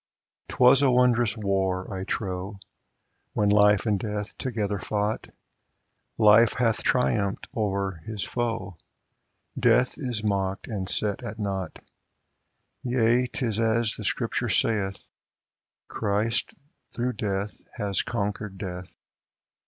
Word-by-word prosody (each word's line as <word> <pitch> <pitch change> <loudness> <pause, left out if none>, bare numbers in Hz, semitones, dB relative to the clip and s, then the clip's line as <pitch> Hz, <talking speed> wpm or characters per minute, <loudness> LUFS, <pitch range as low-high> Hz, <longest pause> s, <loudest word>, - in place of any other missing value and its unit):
'Twas 130 +2 +5
a 140 - +4
wondrous 120 -2 +3
war, 95 -2 -1
I 95 0 -4
trow, 95 0 -3 0.8
When 105 -1 +2
Life 105 0 +5
and 105 -3 +1
Death 105 0 -4
together 105 -5 -2
fought; 105 +3 -2 0.9
Life 110 +1 +6
hath 115 -3 +1
triumphed 105 -6 +1
o'er 100 -5 -1
his 105 -4 -3
foe, 115 -6 -3 0.8
Death 125 +4 +3
is 120 -7 -3
mocked 95 -2 -1
and 100 -4 -4
set 105 -2 0
at 105 +2 -6
nought 95 -5 -3 0.6
\ - - -50
Yea, 125 0 +2
'tis 115 -4 -2
as 115 0 +2
the - - -8
Scripture - - -1
saith, 100 -4 +1 0.9
Christ 110 +2 -1 0.4
through 125 +1 -1
death 100 -3 -3 0.2
has 100 -2 0
conquered 105 -3 -3
Death. 90 -2 -6
105 Hz, 115 wpm, -26 LUFS, 100-115 Hz, 0.9 s, Life